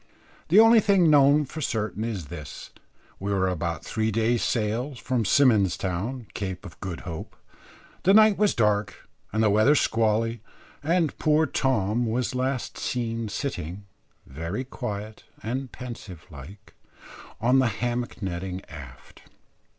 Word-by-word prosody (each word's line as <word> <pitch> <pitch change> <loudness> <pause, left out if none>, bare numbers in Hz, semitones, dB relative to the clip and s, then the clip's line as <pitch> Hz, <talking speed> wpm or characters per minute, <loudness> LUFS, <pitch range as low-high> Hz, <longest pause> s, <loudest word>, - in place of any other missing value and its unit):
The 185 +7 +6
only 225 +1 +8
thing 195 -6 +4
known 145 +1 +5
for 155 +4 -7
certain 110 -5 -2
is 105 -8 -3
this: 75 -4 -9 0.5
we 100 +1 -3
were 95 -2 +1
about 85 -3 -3
three 110 0 -1
days' 115 +2 +1
sail 120 +5 -1
from 125 -1 -1
Symon's 110 -6 +4
Town, 105 +8 -3
Cape 95 -1 -5
of 85 -6 -11
Good 90 -3 -5
Hope. 80 -3 -7 0.7
The 195 +2 +4
night 215 -1 +7
was 210 0 +2
dark 105 -2 0 0.2
and 110 +1 +1
the 105 - +4
weather 110 +8 +5
squally, 115 -2 +1 0.4
and 165 0 +1
poor 155 +1 +3
Tom 120 -5 0
was 120 +3 -1
last 130 0 -2
seen 115 -2 -2
sitting, 95 - -5 0.4
very 85 - -5
quiet 110 -5 -6 0.2
and 130 +4 -3
pensive 110 -9 -9
like, 80 +8 -12 0.7
on 125 +3 +3
the 130 - +3
hammock 120 0 -3
nettings 95 0 -4
aft. - - -12
115 Hz, 140 wpm, -26 LUFS, 100-130 Hz, 0.7 s, only